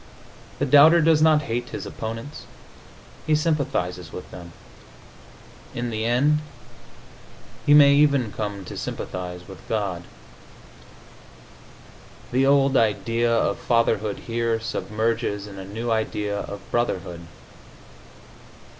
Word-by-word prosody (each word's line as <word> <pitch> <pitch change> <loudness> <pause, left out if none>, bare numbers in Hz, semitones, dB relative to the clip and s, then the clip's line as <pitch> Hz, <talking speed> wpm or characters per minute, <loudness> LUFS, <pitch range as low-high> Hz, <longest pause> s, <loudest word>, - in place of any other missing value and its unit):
The 145 - 0
doubter 150 +5 +7
does 160 -1 +4
not 155 -1 +4
hate 120 -1 -3
his - - -6
opponents; 115 +5 -7 0.8
he 155 - +4
sympathizes 110 - -1
with 90 - -9
them. 85 -1 -10 1.2
In 120 0 -3
the 110 0 -2
end, 140 +6 +2 1.3
he 145 - +7
may 140 -1 +8
even 140 -6 +3
come 100 -3 -5
to - - -8
sympathize 90 -1 -6
with 95 - -11
God.... 100 -6 -2 2.3
The 130 +2 +2
old 140 -1 +4
idea 115 +1 +1
of 115 -3 +1
fatherhood 110 -3 0
here 115 -1 -1
submerges 110 -2 -2
in 100 -2 -10
a 95 - -7
new 115 +4 -4
idea 105 -2 -1
of 100 0 -7
brotherhood. 90 -7 -2
115 Hz, 110 wpm, -23 LUFS, 100-140 Hz, 2.3 s, may